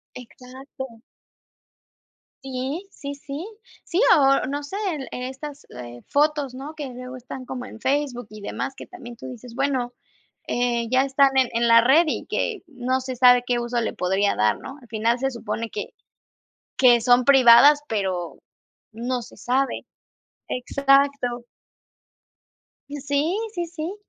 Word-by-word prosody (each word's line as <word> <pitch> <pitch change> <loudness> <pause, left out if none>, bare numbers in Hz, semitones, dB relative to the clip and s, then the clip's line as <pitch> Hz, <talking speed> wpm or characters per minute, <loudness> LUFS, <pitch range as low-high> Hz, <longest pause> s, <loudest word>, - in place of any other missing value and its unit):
Exacto. 255 0 -10 1.4
Sí 270 +8 -4
sí 280 0 -7
sí 280 +3 -7 0.4
sí, 345 - -1 0.2
o 275 -3 +4
no 285 +2 -3
sé, 290 +7 -7 0.2
el, 275 -3 -6
e 250 +1 -4
estas, 285 +2 -9
eh, 120 -1 -10
fotos, 290 -2 +1
¿no?, 280 +4 -8
que 295 -3 -5
luego 250 +1 -8
están 255 +1 -8
como 250 0 -6
en 220 - -12
Facebook 265 -4 -1
y 215 0 -10
demás, 260 +6 -4
que - - -9
también 240 -10 -11
tú - - -10
dices, 245 -1 -10
bueno, 265 -3 0 0.5
eh, 240 -1 0
ya 255 +1 +4
están 270 0 +3
en 260 -2 +4
en 235 0 +1
la 230 0 +7
red 275 +8 +5
y 310 - -3
que 435 -5 -2
no 255 -2 -1
se 260 0 -5
sabe 245 0 +6
qué 245 -1 0
uso 240 0 -1
le 225 - -2
podría 190 +3 0
dar, 105 -1 +2
¿no?, 270 - -9
al 245 - -17
final 225 +2 0
se 270 +1 0
supone 230 -1 -4
que 205 - -6 0.8
que 245 -2 +6
son 245 +1 +4
privadas, 270 +2 +7
pero 190 -5 -3 0.5
no 240 +3 -3
se - - -13
sabe, 265 +2 -1 0.6
exacto. 275 -1 +1 1.5
Y 290 - -5
sí 285 +7 0 0.2
sí 345 -1 -2
sí, 335 +2 -5
255 Hz, 155 wpm, -23 LUFS, 240-280 Hz, 1.5 s, la